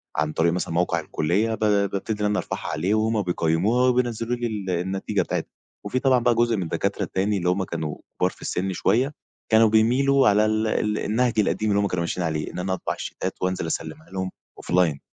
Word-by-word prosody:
عن 75 Hz, +1 st, 0 dB
طريق 85 Hz, +1 st, +2 dB
مثلًا 90 Hz, -2 st, -2 dB
موقع 85 Hz, +1 st, +1 dB
الكلية 100 Hz, +9 st, 0 dB
ب -, -, -16 dB
بابتدي 105 Hz, 0 st, 0 dB
إن -, -, +1 dB
أنا 105 Hz, 0 st, +1 dB
أرفعها -, -, -5 dB
عليه، 90 Hz, +8 st, 0 dB
وهم 110 Hz, 0 st, +1 dB
بيقيموها 90 Hz, +8 st, +2 dB
وبينزلوا 120 Hz, -1 st, 0 dB
لي 120 Hz, 0 st, -2 dB
ال 105 Hz, -4 st, -4 dB
النتيجة 95 Hz, +2 st, -1 dB
بتاعتها. -, -, -3 dB, 0.3 s
وفي 130 Hz, -, -1 dB
طبعًا 130 Hz, -2 st, +4 dB
بقى 120 Hz, 0 st, +2 dB
جزء 120 Hz, 0 st, +2 dB
من 95 Hz, -, -1 dB
الدكاترة 80 Hz, -, -1 dB
التاني 100 Hz, +2 st, 0 dB
اللي 90 Hz, -1 st, 0 dB
هم 95 Hz, +1 st, +1 dB
كانوا 80 Hz, -4 st, -4 dB, 0.2 s
كبار 90 Hz, -, +3 dB
في -, -, -17 dB
السن 95 Hz, +1 st, -2 dB
شويّة، 120 Hz, +11 st, +1 dB, 0.4 s
كانوا 110 Hz, 0 st, +6 dB
بيميلوا 130 Hz, +6 st, +4 dB
على 105 Hz, +1 st, +4 dB
ال 110 Hz, +1 st, +1 dB
ال 105 Hz, 0 st, 0 dB
النهج 115 Hz, +1 st, +1 dB
القديم 110 Hz, +1 st, +1 dB
اللي 100 Hz, 0 st, +3 dB
هم 100 Hz, -, +1 dB
كانوا 90 Hz, -2 st, -2 dB
ماشيين 85 Hz, +1 st, -2 dB
عليه، 80 Hz, -1 st, -2 dB
إن -, -, -6 dB
أنا 95 Hz, +1 st, -1 dB
أطبع 95 Hz, -, -2 dB
الشيتات -, -, -4 dB
وأنزل 90 Hz, -2 st, -1 dB
أسلمها 155 Hz, -, -5 dB
لهم 95 Hz, -1 st, -3 dB, 0.3 s
أوفلاين. 85 Hz, -5 st, +1 dB
100 Hz, 205 wpm, -24 LUFS, 90-115 Hz, 0.4 s, كانوا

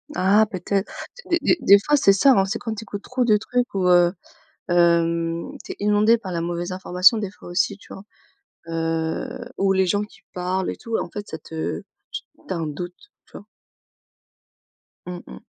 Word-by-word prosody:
Ah 205 Hz, +4 st, +4 dB
peut-être, 195 Hz, +2 st, -2 dB, 0.4 s
des 345 Hz, -, +3 dB
des 350 Hz, -, +3 dB
des 200 Hz, +1 st, +8 dB
fois 295 Hz, -, +4 dB
c'est 200 Hz, -8 st, +5 dB
ça, 270 Hz, +8 st, +5 dB
hein, 195 Hz, -5 st, +4 dB
c'est 205 Hz, +4 st, -3 dB
quand 225 Hz, -2 st, -4 dB
tu 220 Hz, -, -7 dB
écoutes 205 Hz, -1 st, -7 dB
trop 255 Hz, 0 st, -1 dB
de 215 Hz, -3 st, +4 dB
trucs 245 Hz, +3 st, -2 dB
où 185 Hz, -2 st, +1 dB
heu, 175 Hz, -1 st, +5 dB, 0.6 s
hem, 170 Hz, -1 st, +2 dB
tu -, -, -6 dB
es -, -, -19 dB
inondé 210 Hz, +3 st, +4 dB
par 195 Hz, -5 st, -7 dB
la 170 Hz, -1 st, -2 dB
mauvaise 175 Hz, +1 st, -3 dB
information 185 Hz, +3 st, +4 dB
des 205 Hz, -3 st, -3 dB
fois 195 Hz, -, -13 dB
aussi, 195 Hz, +3 st, 0 dB
tu -, -, -13 dB
vois, 195 Hz, -, -10 dB, 0.7 s
heu, 165 Hz, +7 st, -2 dB
ou 195 Hz, 0 st, +2 dB
les 190 Hz, 0 st, +3 dB
gens 205 Hz, +3 st, +1 dB
qui 210 Hz, -, -14 dB
parlent 180 Hz, +1 st, -1 dB
et -, -, -5 dB
tout, 230 Hz, -2 st, -3 dB
et -, -, -1 dB
en -, -, -6 dB
fait 205 Hz, 0 st, -7 dB
ça 160 Hz, -, -6 dB
te 160 Hz, 0 st, -5 dB, 0.7 s
tu -, -, -2 dB
as -, -, -3 dB
un 165 Hz, -2 st, -2 dB
doute, 175 Hz, +4 st, -6 dB, 0.3 s
tu -, -, -28 dB
vois? -, -, -13 dB, 1.6 s
Mmh 180 Hz, -1 st, -6 dB
mh. 65 Hz, -, -11 dB
190 Hz, 200 wpm, -23 LUFS, 175-210 Hz, 1.6 s, des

